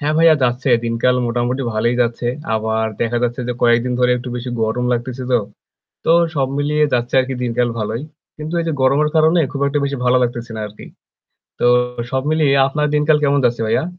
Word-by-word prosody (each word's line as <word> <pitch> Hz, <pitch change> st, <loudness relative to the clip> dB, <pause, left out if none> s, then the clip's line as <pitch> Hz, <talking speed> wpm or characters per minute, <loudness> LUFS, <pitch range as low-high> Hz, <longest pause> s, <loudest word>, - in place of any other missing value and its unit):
হ্যাঁ, 150 Hz, +1 st, 0 dB
ভাইয়া। 165 Hz, -1 st, +6 dB
যাচ্ছে, 125 Hz, +2 st, 0 dB, 0.2 s
দিনকাল 115 Hz, +2 st, +1 dB
মোটামুটি 120 Hz, +3 st, -1 dB
ভালোই 115 Hz, +3 st, 0 dB
যাচ্ছে। 120 Hz, +1 st, -3 dB, 0.3 s
আবার 110 Hz, 0 st, -1 dB, 0.2 s
দেখা 120 Hz, 0 st, 0 dB
যাচ্ছে 120 Hz, +1 st, -1 dB
যে 125 Hz, -, 0 dB
কয়েকদিন 120 Hz, +1 st, +3 dB
ধরে 125 Hz, 0 st, +3 dB
একটু 125 Hz, +1 st, -7 dB
বেশি 125 Hz, +1 st, -5 dB
গরম 110 Hz, +3 st, -1 dB
লাগতেছে। 125 Hz, +2 st, -3 dB
তো 125 Hz, -, +5 dB, 0.7 s
তো -, -, +3 dB, 0.2 s
সব 135 Hz, -2 st, +1 dB
মিলিয়ে 150 Hz, +1 st, +1 dB
যাচ্ছে 120 Hz, 0 st, -1 dB
আরকি 130 Hz, +1 st, -1 dB
দিনকাল 120 Hz, 0 st, 0 dB
ভালোই। 110 Hz, +3 st, -3 dB, 0.4 s
কিন্তু 155 Hz, +2 st, -6 dB
এই 165 Hz, -, -2 dB
যে 165 Hz, -, 0 dB
গরমের 140 Hz, +3 st, +3 dB
কারণে 160 Hz, +2 st, +4 dB
খুব 140 Hz, -, -5 dB
একটা 145 Hz, +1 st, 0 dB
বেশি 140 Hz, 0 st, -2 dB
ভালো 125 Hz, +1 st, +4 dB
লাগতেছে 120 Hz, -1 st, -4 dB
না 110 Hz, -, -5 dB
আরকি। 105 Hz, +1 st, -13 dB, 0.8 s
তো -, -, 0 dB, 0.5 s
সব 130 Hz, 0 st, -1 dB
মিলিয়ে 155 Hz, -3 st, +2 dB, 0.2 s
আপনার 150 Hz, +1 st, -1 dB
দিনকাল 150 Hz, +1 st, +3 dB
কেমন 140 Hz, -1 st, +2 dB
যাচ্ছে 120 Hz, -1 st, +1 dB
ভাইয়া? 110 Hz, -, +1 dB
125 Hz, 195 wpm, -18 LUFS, 120-145 Hz, 0.8 s, ভাইয়া